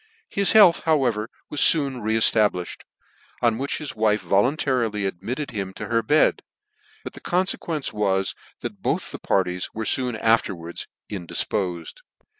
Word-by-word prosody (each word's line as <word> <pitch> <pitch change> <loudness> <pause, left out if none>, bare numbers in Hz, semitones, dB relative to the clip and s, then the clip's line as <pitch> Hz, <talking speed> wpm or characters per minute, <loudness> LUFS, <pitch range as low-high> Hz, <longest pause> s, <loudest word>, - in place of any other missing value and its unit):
His 200 -1 +2
health, 205 -6 +7
however, 125 -9 +1 0.2
was 150 - -1
foon 140 -6 +3
re 110 +1 0
eftablifhed; 105 -5 +2 0.6
on 115 -1 +2
whicn 140 +1 -2
his 150 -2 -5
wife 105 -1 +2
voluntarily 110 - +1
admitted 110 +10 -4
him 100 -4 -5
{o - - -4
her 115 -1 +1
bed: 150 +6 +3 0.6
but - - -7
the - - -10
confluence 175 -5 -1
was, 95 -3 0 0.3
that - - -6
both - - -1
the - - -7
par 95 - +2
ties 90 0 -4
were 110 0 -3
foon 125 -1 0
afterwards 95 -7 0 0.2
indifpofed. 90 -2 -3
110 Hz, 145 wpm, -23 LUFS, 95-135 Hz, 0.6 s, health